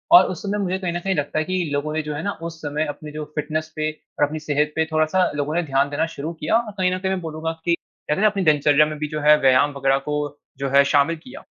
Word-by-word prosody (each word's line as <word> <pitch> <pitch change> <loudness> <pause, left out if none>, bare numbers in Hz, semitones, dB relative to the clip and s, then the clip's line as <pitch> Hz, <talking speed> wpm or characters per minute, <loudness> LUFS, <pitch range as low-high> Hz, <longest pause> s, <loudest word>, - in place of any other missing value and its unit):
और - - +9
उस 175 - -6
समय 205 +1 -1
मुझे 185 0 -1
कहीं 180 -3 -2
न 175 - -2
कहीं 190 +1 -1
लगता 145 +1 -1
है - - +1
कि 185 0 -1
लोगों 145 +2 -1
ने 155 - 0
जो 150 -1 -5
है 150 - -3
ना 200 - 0 0.2
उस 165 - -12
समय 150 +1 -1
अपनी 150 +1 -7
जो 150 0 -5
फिटनेस 155 +1 -2
पे 155 0 0
अ, 155 - -5
अपनी 155 +2 -5
सेहत 150 0 0
पे 160 - +2
थोड़ा-सा 155 +4 +2
लोगों 145 +2 -2
ने 175 - +1
ध्यान 140 -1 +1
देना 145 +3 0
शुरू 155 +4 -4
किया। 155 +5 -1
और 230 -2 -3
कहीं 185 -1 +2
न - - -4
कहीं 190 0 -1
मैं 190 - -1
बोलूँगा 160 0 -3
कि 170 -1 +3
कहते 150 0 -5
ना 215 - +6
अपनी 200 -2 0
दिनचर्या 150 -1 +4
में 155 0 -5
भी 150 - -2
जो 150 - -2
है 150 +1 +6
व्यायाम 135 +2 +4
वग़ैरह 135 0 +3
को 150 - 0 0.4
जो 135 0 -2
है 140 +1 +6
शामिल 145 +3 +3
किया। 255 - -11
155 Hz, 280 wpm, -22 LUFS, 145-175 Hz, 0.4 s, और